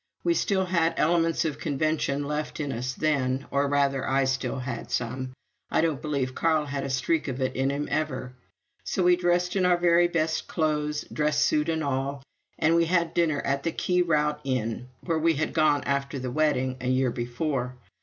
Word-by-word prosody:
We 345 - +3
still 195 - +1
had 170 -2 +1
elements 165 0 +2
of 155 - -2
convention 145 -1 0
left 150 +2 -3
in 145 -2 -2
us 125 +1 -3
then, 135 -3 0
or, 140 0 +2
rather, 140 -1 +1
I 135 +1 +3
still 135 0 -1
had 125 -2 -5
some; 130 +2 -2 0.4
I - - +2
don't 160 -4 0
believe 140 -4 -2
Carl 160 0 +1
had 140 -1 -3
a 135 - -3
streak 135 +6 0
of 130 -1 -3
it 130 0 -1
in 135 +1 +1
him 140 +1 -2
ever, 130 -5 -2 0.5
so 185 - -1
we 180 0 +6
dressed 175 +1 +1
in 190 - +2
our 180 -1 +4
very 175 0 +4
best 160 -2 -1
clothes, 150 -2 -1
dress 150 -1 +1
suit 150 +1 +2
and 160 -1 0
all, 140 0 -2 0.3
and 165 +2 +3
had 170 0 +1
dinner 160 -4 +1
at 140 0 -1
the 165 - -1
Key 180 +2 +1
Route 150 -3 +1
Inn, 125 -2 -2
where 165 -2 -1
we 165 0 +3
had 155 - -1
gone 155 -2 +3
after 140 0 -1
the 130 -1 -4
wedding 130 -3 +1
a 125 - -3
year 130 0 +2
before. 125 +2 -2
150 Hz, 195 wpm, -26 LUFS, 135-165 Hz, 0.5 s, we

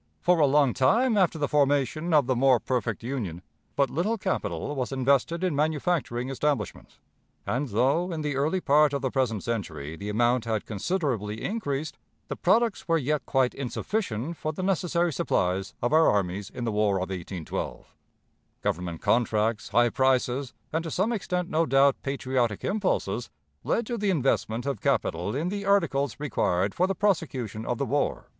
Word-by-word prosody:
For 175 -1 +3
a 150 - +5
long 140 -3 +3
time 225 - +3
after 185 -5 +2
the 145 -2 0
formation 145 +3 +1
of 150 -4 +5
the 130 0 +1
"more 130 0 +4
perfect 120 -4 -2
Union," 105 -10 -4 0.3
but 140 -2 +2
little 195 +10 0
capital 185 -6 -2
was 130 -1 -2
invested 140 +6 +1
in 180 -5 +1
manufacturing 150 -4 0
establishments; 135 -6 -2 0.5
and, 135 +4 -1
though 135 - +1
in 160 -2 -3
the 145 -2 -1
early 155 +7 0
part 150 -1 +4
of 140 - -2
the 130 - 0
present 120 -6 0
century 80 -10 -4
the 100 +5 -6
amount 120 +2 +2
had 110 -2 -1
considerably 110 - -2
increased, 155 -9 -3 0.3
the - - -3
products 230 -5 +1
were 165 -1 +3
yet 150 0 -1
quite 130 -2 +2
insufficient 140 - -3
for 155 - -2
the 170 +4 -5
necessary 175 -3 +1
supplies 95 -4 -1
of 120 - +1
our 160 +1 +6
armies 100 0 -1
in 120 - -6
the 115 - -1
War 105 -1 +2
of 95 0 -2
1812. 90 -2 -5 0.7
Government 85 -1 -2
contracts, 110 -2 +1
high 120 0 +4
prices, 130 +1 +1 0.2
and 160 +1 0
to 165 - -4
some 195 +9 0
extent, 180 -4 -2
no 160 0 +1
doubt, 135 +1 +4
patriotic 130 -5 -1
impulses, 205 -3 -1 0.3
led 235 - 0
to 235 0 -3
the 205 -1 0
investment 120 - 0
of 140 -7 -2
capital 105 -7 0
in 160 +6 -1
the 200 +1 -3
articles 170 -10 +1
required 100 -9 0
for 185 - +2
the 195 - -1
prosecution 135 - -1
of 120 - -1
the 140 - -1
war. 145 +2 -1
135 Hz, 170 wpm, -27 LUFS, 115-165 Hz, 0.7 s, our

